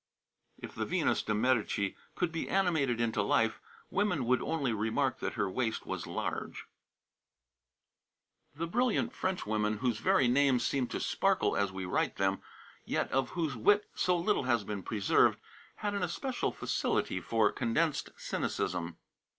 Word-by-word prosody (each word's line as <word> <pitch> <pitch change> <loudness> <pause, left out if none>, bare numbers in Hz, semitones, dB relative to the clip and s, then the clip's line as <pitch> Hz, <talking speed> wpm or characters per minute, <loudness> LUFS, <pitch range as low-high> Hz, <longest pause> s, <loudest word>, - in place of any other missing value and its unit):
'" - - -47
"If - - -7
the - - -3
Venus - - +1
de 105 - -1
Medici 105 -4 +1 0.2
could 180 -2 0
be 165 - -3
animated 160 -11 +2
into 115 -1 +1
life, - - +2 0.3
women 185 -9 +1
would 125 +2 +2
only 140 -7 -1
remark 110 +1 0
that - - -3
her 100 - 0
waist 110 +3 -2
was - - -4
large." - - -4 1.9
The 165 +3 -2
brilliant 240 +7 +1
Frenchwomen 110 - -1
whose 120 -1 0
very 125 - +3
names 130 0 +3
seem 135 -3 0
to - - -4
sparkle - - +1
as 100 -1 +1
we 95 0 -5
write 90 - 0
them, - - 0 0.4
yet - - -1
of 130 -1 +1
whose 160 -6 0
wit 205 - +3
so 180 -1 +2
little 175 -4 +1
has 120 -4 +2
been 100 -1 -4
preserved, 100 +1 +3 0.4
had 205 -1 -3
an 200 - -1
especial 245 - -2
facility 90 - -1
for 110 +4 +2
condensed 145 +5 0
cynicism. 85 -1 -2
125 Hz, 150 wpm, -31 LUFS, 105-170 Hz, 1.9 s, very